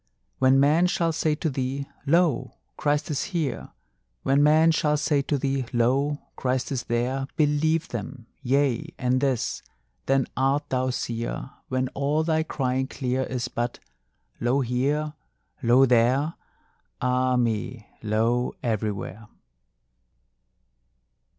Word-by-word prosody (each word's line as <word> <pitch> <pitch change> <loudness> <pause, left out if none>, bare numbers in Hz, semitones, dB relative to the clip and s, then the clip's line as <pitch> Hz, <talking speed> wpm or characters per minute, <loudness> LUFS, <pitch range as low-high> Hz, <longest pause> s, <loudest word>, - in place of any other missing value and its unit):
When 130 +1 +5
men 155 +6 +4
shall 170 -2 +1
say 155 -1 0
to 160 - -2
thee: 135 +1 -3 0.2
Lo! 150 -6 +2 0.2
Christ 150 +1 0
is 145 - -1
here, 155 -5 -2 0.5
When 140 +1 +3
men 155 +2 +5
shall 150 -1 +2
say 145 -1 +1
to 145 +1 -1
thee: 135 -2 -1
Lo! 135 +5 +2 0.2
Christ 130 +2 -1
is 130 -3 -2
there, 125 +3 -1
Believe 155 +2 +1
them: 120 +2 -6 0.2
yea, 135 -2 0
and 130 +1 +1
this 135 -5 0 0.5
then 135 -1 +3
art 135 +3 +1
thou 130 0 0
seer, 120 +1 -3 0.2
When 130 0 0
all 145 +3 0
thy 160 -1 +1
crying 130 -4 -1
clear 130 -1 -2
Is 125 -2 -3
but: 120 +1 -3 0.6
Lo 125 +4 +2
here! 140 +5 0 0.5
lo 125 +2 +5
there! 125 +5 +3 0.7
ah 125 0 +1
me, 115 -1 -1
lo 115 +3 0
everywhere!" 110 -1 -3
130 Hz, 125 wpm, -25 LUFS, 125-145 Hz, 0.7 s, When